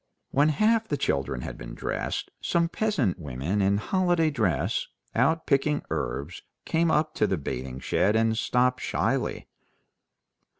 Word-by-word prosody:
When 145 Hz, +3 st, +4 dB
half 220 Hz, +7 st, +2 dB
the 145 Hz, -, -1 dB
children 70 Hz, -, -1 dB
had -, -, -7 dB
been -, -, -8 dB
dressed, -, -, -3 dB
some 170 Hz, 0 st, +1 dB
peasant 160 Hz, -, 0 dB
women 75 Hz, +7 st, -2 dB
in 100 Hz, +1 st, +3 dB
holiday 175 Hz, -, +2 dB
dress, 95 Hz, -, 0 dB, 0.3 s
out 160 Hz, +7 st, +2 dB
picking 145 Hz, +1 st, +1 dB
herbs, 70 Hz, +8 st, -3 dB, 0.2 s
came 165 Hz, +1 st, +2 dB
up 155 Hz, 0 st, +2 dB
to 105 Hz, -, +2 dB
the 95 Hz, -, 0 dB
bathing 65 Hz, -2 st, -5 dB
shed 105 Hz, +9 st, +1 dB
and 110 Hz, 0 st, +3 dB
stopped 125 Hz, +2 st, +1 dB
shyly. -, -, -1 dB
115 Hz, 140 wpm, -27 LUFS, -, 0.3 s, When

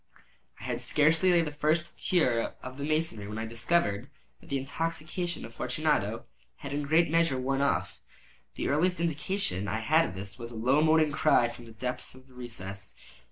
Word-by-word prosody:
I -, -, -11 dB
had -, -, -3 dB
scarcely 165 Hz, +5 st, +3 dB
laid 170 Hz, -2 st, +4 dB
the 150 Hz, -, -4 dB
first 155 Hz, +3 st, 0 dB
tier 125 Hz, -11 st, +2 dB
of 130 Hz, +2 st, -8 dB
my -, -, -3 dB
masonry 155 Hz, -9 st, -1 dB
when 105 Hz, +1 st, -5 dB
I 110 Hz, -, -2 dB
discovered 115 Hz, -1 st, 0 dB, 0.3 s
that -, -, -18 dB
the 140 Hz, -, 0 dB
intoxication 165 Hz, +5 st, -3 dB
of -, -, -11 dB
Fortunato -, -, -1 dB, 0.3 s
had 140 Hz, 0 st, -7 dB
in 145 Hz, -, 0 dB
a -, -, -6 dB
great 160 Hz, +1 st, +4 dB
measure 165 Hz, -5 st, +3 dB
worn 135 Hz, +2 st, 0 dB
off. 140 Hz, -, 0 dB, 0.6 s
The -, -, -2 dB
earliest 175 Hz, +5 st, +2 dB
indication 160 Hz, -, -1 dB
I 110 Hz, +2 st, -1 dB
had 155 Hz, +8 st, +3 dB
of -, -, -9 dB
this 100 Hz, +5 st, -7 dB
was 115 Hz, 0 st, -5 dB
a 120 Hz, -, -9 dB
low 130 Hz, +7 st, +3 dB
moaning 155 Hz, -1 st, +4 dB
cry 140 Hz, -5 st, +4 dB
from 120 Hz, 0 st, -11 dB
the 115 Hz, -, -12 dB
depth 125 Hz, +3 st, -5 dB
of 130 Hz, 0 st, -16 dB
the 130 Hz, -, -20 dB
recess. 100 Hz, -6 st, -7 dB
140 Hz, 195 wpm, -29 LUFS, 115-160 Hz, 0.6 s, laid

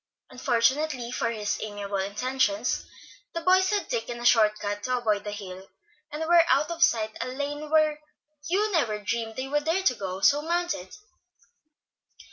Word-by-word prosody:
Unfortunately 255 Hz, +1 st, 0 dB
for 250 Hz, -, -1 dB
his 210 Hz, -3 st, -2 dB
amiable 205 Hz, -1 st, -4 dB
intentions, 210 Hz, +3 st, 0 dB, 0.5 s
the 335 Hz, -, -2 dB
boys 375 Hz, +2 st, +4 dB
had 410 Hz, -4 st, 0 dB
taken 235 Hz, 0 st, -3 dB
a 240 Hz, -, -6 dB
short 215 Hz, -3 st, +5 dB
cut 205 Hz, 0 st, -4 dB
to 255 Hz, +4 st, 0 dB
avoid 215 Hz, -4 st, 0 dB
the 210 Hz, -, -5 dB
hill, 190 Hz, -2 st, -8 dB, 0.4 s
and 300 Hz, +2 st, -4 dB
were 340 Hz, 0 st, +6 dB
out 290 Hz, +5 st, +3 dB
of 335 Hz, 0 st, -6 dB
sight 220 Hz, -8 st, +3 dB
down -, -, -3 dB
a -, -, -6 dB
lane 290 Hz, +2 st, -4 dB
where 310 Hz, -1 st, +3 dB, 0.5 s
Hugh 410 Hz, +5 st, +1 dB
never 245 Hz, -, +1 dB
dreamed 225 Hz, +2 st, -3 dB
they 260 Hz, +1 st, -4 dB
would 295 Hz, +1 st, -1 dB
dare 340 Hz, +4 st, +1 dB
to 255 Hz, -, +4 dB
go, 190 Hz, -4 st, -5 dB
so 290 Hz, +7 st, +4 dB
mounted. 340 Hz, -, -2 dB
250 Hz, 170 wpm, -26 LUFS, 210-310 Hz, 0.5 s, were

